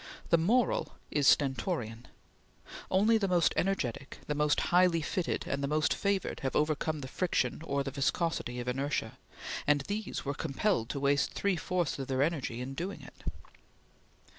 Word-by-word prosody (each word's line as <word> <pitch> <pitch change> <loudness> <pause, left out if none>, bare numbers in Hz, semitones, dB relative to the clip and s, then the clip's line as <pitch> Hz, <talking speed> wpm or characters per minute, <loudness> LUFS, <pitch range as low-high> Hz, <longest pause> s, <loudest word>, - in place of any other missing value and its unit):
The 170 - +7
moral 230 +8 +2 0.2
is 145 -2 +2
stentorian. 120 -4 +1 0.8
Only 215 +4 +4
the 200 - +1
most 175 -2 +3
energetic, 140 -9 -1
the 150 - -1
most 150 0 +2
highly 175 -2 +5
fitted, 175 +2 -1
and 140 - -2
the 140 - 0
most 155 +2 +2
favored 200 -2 -1
have 135 - -2
overcome 155 0 +1
the 130 - -5
friction 175 +2 0
or 140 -3 -1
the 135 - -4
viscosity 140 -2 -1
of 120 - -5
inertia, 135 -3 -2 0.5
and 145 -1 +4
these 205 +5 -4
were 140 - -1
compelled 145 - 0
to 140 - -2
waste 140 -1 +2
three 200 -2 +1
fourths 175 -3 -1
of 135 - -4
their 130 0 +2
energy 140 -7 -1
in 130 +2 -5
doing 175 +8 -5
it. - - -14
150 Hz, 165 wpm, -31 LUFS, 135-180 Hz, 0.8 s, The